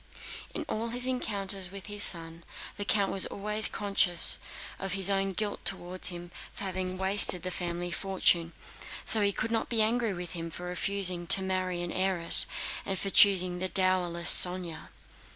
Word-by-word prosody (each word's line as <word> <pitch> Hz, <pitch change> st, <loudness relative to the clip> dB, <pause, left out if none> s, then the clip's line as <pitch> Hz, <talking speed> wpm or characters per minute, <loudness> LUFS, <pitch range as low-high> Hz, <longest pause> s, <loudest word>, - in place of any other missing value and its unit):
In -, -, -7 dB
all 225 Hz, +2 st, -5 dB
his 245 Hz, +2 st, -4 dB
encounters 200 Hz, -7 st, -3 dB
with 195 Hz, 0 st, -11 dB
his 205 Hz, 0 st, -7 dB
son, 165 Hz, -1 st, 0 dB, 0.3 s
the 205 Hz, -, -6 dB
count 200 Hz, -1 st, 0 dB
was 195 Hz, -, +1 dB
always 210 Hz, +2 st, +4 dB
conscious 195 Hz, -4 st, +2 dB, 0.4 s
of 195 Hz, -1 st, -5 dB
his 195 Hz, 0 st, +1 dB
own 195 Hz, 0 st, -1 dB
guilt 210 Hz, +2 st, -5 dB
toward 180 Hz, +1 st, 0 dB
him 175 Hz, -1 st, -7 dB, 0.2 s
for -, -, -6 dB
having 185 Hz, -1 st, -5 dB
wasted 190 Hz, -2 st, +2 dB
the 185 Hz, -, -5 dB
family 175 Hz, 0 st, -4 dB
fortune, 175 Hz, -2 st, 0 dB
and -, -, -24 dB, 0.5 s
so 220 Hz, -, +5 dB
he 200 Hz, -1 st, 0 dB
could 220 Hz, +3 st, -5 dB
not 225 Hz, -, -3 dB
be 225 Hz, -2 st, +1 dB
angry 230 Hz, -1 st, -2 dB
with 175 Hz, -1 st, -8 dB
him 170 Hz, -1 st, -8 dB
for 175 Hz, -, -10 dB
refusing 180 Hz, -1 st, -3 dB
to 190 Hz, -, +7 dB
marry 185 Hz, -2 st, -4 dB
an 175 Hz, -, -6 dB
heiress 185 Hz, -2 st, +4 dB, 0.4 s
and 195 Hz, -1 st, -4 dB, 0.2 s
choosing 185 Hz, -3 st, +4 dB
the 185 Hz, +1 st, -3 dB
dowerless 180 Hz, -3 st, +1 dB
Sónya. 180 Hz, -2 st, +3 dB
185 Hz, 170 wpm, -27 LUFS, 175-200 Hz, 0.5 s, to